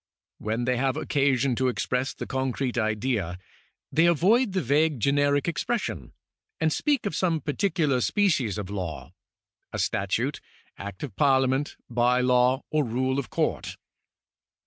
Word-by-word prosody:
When 110 +3 -2
they 125 0 +1
have 130 +1 0
occasion 135 -2 +1
to 130 - +2
express 125 +1 -1
the - - -5
concrete 130 -1 -2
idea, 110 -5 -1 0.5
they 165 +2 +4
avoid 195 - +3
the 190 - +1
vague 145 +2 +2
generic 145 +4 +2
expression, 150 - -2 0.5
and 160 -1 +2
speak 290 -6 0
of 200 - -2
some 170 -4 +1
particular 150 -4 0
species 145 - +1
of 100 -2 -5
law 90 -6 -5 0.3
— - - -58
a - - -4
statute. 115 +8 -1 0.3
Act 100 +3 -8
of 125 -10 -6
Parliament, 135 0 +2
by 120 +1 +2
law, 125 +1 +3
or 155 -1 +2
rule 130 +2 0
of 140 - -5
Court. - - -2
130 Hz, 145 wpm, -26 LUFS, 120-150 Hz, 0.5 s, they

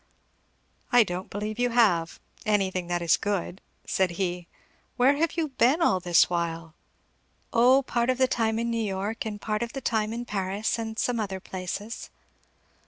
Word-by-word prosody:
"I 245 -1 +7
don't 180 -2 -5
believe 210 +2 -4
you 245 0 +2
have, 200 -9 +2 0.2
anything 190 -4 0
that 175 0 -1
is 170 - +4
good," 195 -2 -3 0.2
said 190 -1 +1
he. 180 -2 -2 0.5
"Where 260 +3 +5
have 330 +1 +1
you 320 -2 0
been 265 +3 +3
all 190 - +3
this 175 -1 +4
while?" 165 -2 -3 0.8
"O 255 +4 +5
part 240 -1 0
of 255 - +2
the 260 0 +3
time 225 -3 0
in 235 +1 -1
New 230 -1 0
York, 205 +3 -3
and 210 -1 -5
part 215 +1 -2
of 235 -1 -3
the 270 - -4
time 220 -3 0
in 235 +1 -4
Paris, 200 +2 -2
and 220 -1 -5
some 245 -1 0
other 195 -3 -3
places." 190 +4 -6
215 Hz, 170 wpm, -26 LUFS, 185-235 Hz, 0.8 s, I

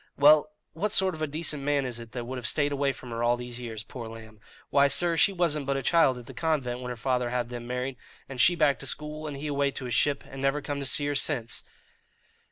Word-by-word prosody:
"Well, 150 +1 +6 0.2
what 200 +6 -1
sort 190 -3 +4
of 155 - -8
a 155 - 0
decent 150 0 -1
man 140 -1 +1
is 120 -2 -4
it 115 -1 -10
that 120 -2 -4
would 130 +1 -5
have 120 - -3
stayed 145 -1 +1
away 140 -1 +1
from 125 -2 -10
her 115 0 -3
all 120 +1 +3
these 120 0 -6
years, 110 -3 -6
poor 120 -1 -8
lamb? 110 -1 -11 0.3
Why, 140 0 +5
sir, 170 +4 +2
she 180 - +4
wasn't 160 -6 0
but 140 0 +1
a 135 - -3
child 165 -7 +4
at 120 - -10
the 135 - -10
convent 125 -3 -1
when 125 0 -6
her 125 - -4
father 125 0 0
had 120 -1 -2
them 120 -1 -7
married, 125 +1 -3 0.3
and 130 -2 -2
she 175 +7 +6
back 150 -4 +3
to 135 - -5
school, 150 +3 -3
and 145 -2 -5
he 145 - -6
away 140 -1 +1
to 130 - -6
his 120 - -3
ship, 145 +4 +2
and 135 - -8
never 135 +2 +1
come 145 -1 -4
to 140 - -2
see 145 - +4
her 145 - 0
since." 135 -5 +1
135 Hz, 265 wpm, -28 LUFS, 125-150 Hz, 0.3 s, Well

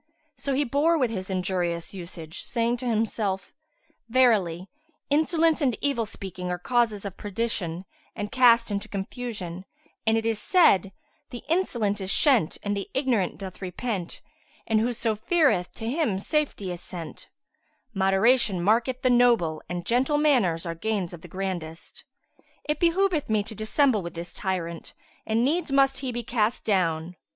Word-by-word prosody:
So 275 -2 -2
he 285 - +2
bore 290 +6 +2
with 250 -6 +1
his 190 -3 -5
injurious 180 -2 -2
usage, 170 -2 -7
saying 235 0 0
to 250 +1 -5
himself, 215 -4 -1 0.6
"Verily 205 -8 +3 0.4
insolence 320 +2 +3
and 255 -5 +2
evil 270 -6 0
speaking 185 -3 -6
are 180 - -1
causes 220 +1 0
of 195 -2 -6
perdition 195 -4 -3 0.3
and 205 0 -4
cast 235 -3 +5
into 205 +1 -3
confusion, 195 -3 -5 0.4
and 220 0 +4
it 225 - -2
is 225 -2 0
said, 200 - +4 0.4
'The 240 - -8
insolent 235 - 0
is 190 - -3
shent 250 - +3
and 205 0 -1
the 200 - -4
ignorant 255 -8 +1
doth 190 -1 -8
repent; 185 0 -4 0.4
and 220 -1 +2
whose 240 +1 -1 0.2
feareth, 295 - +3
to 225 - -6
him 265 - 0
safety 210 -4 -1
is 175 0 -6
sent': 170 -4 -8 0.6
moderation 195 +2 +3
marketh 235 +7 +1
the 255 - +4
noble 235 -11 +3
and 175 -1 -4
gentle 260 +7 +2
manners 240 - +2
are 170 - -2
of 165 - -18
gains 210 -5 -1
the 175 0 -10
grandest. 175 -3 -6 0.6
It 300 0 -1
behoveth 345 -3 +2
me 215 -1 +2
to 220 - -10
dissemble 220 +2 +2
with 170 -1 -7
this 170 +1 -6
tyrant 170 -4 -3 0.3
and 225 +2 +2
needs 315 +2 0
must 270 -1 +3
he 260 -2 -3
be 240 0 -4
cast 230 0 0
down." 175 -4 0
215 Hz, 155 wpm, -26 LUFS, 185-255 Hz, 0.6 s, cast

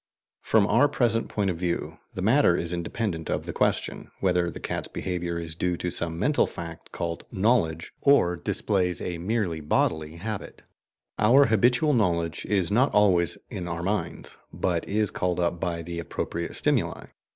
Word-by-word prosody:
From 110 -2 +3
our 115 +8 +4
present 115 -5 +1
point 100 -3 0
of 85 - -5
view, 85 -1 -2 0.2
the 95 - -3
matter 115 -4 +4
is 85 +1 -2
independent 85 0 -3
of - - -1
the - - -5
question - - -1
whether 90 -2 +2
the - - -8
cat's - - -3
behaviour 85 -2 -3
is 85 -1 -4
due 90 +1 -1
to 90 - -3
some 85 -1 -1
mental 145 - +2
fact 85 -1 -9
called 85 -1 -4
"knowledge," 95 -6 +1
or 140 -11 +4
displays 90 +2 -1
a 85 -2 -4
merely 95 -3 -1
bodily 75 +1 0
habit. 105 +4 -6 0.6
Our 125 +7 +6
habitual 120 +7 +3
knowledge 85 -7 0
is 95 -4 +1
not 125 +6 +3
always 90 -6 +4
in 90 - -5
our 85 0 -4
minds, 105 +3 -3
but 85 -2 -1
is 105 0 +1
called 90 -1 -1
up 85 0 0
by 85 -2 -2
the 85 +1 -5
appropriate 85 +1 -4
stimuli. - - 0
90 Hz, 165 wpm, -26 LUFS, 85-105 Hz, 0.6 s, Our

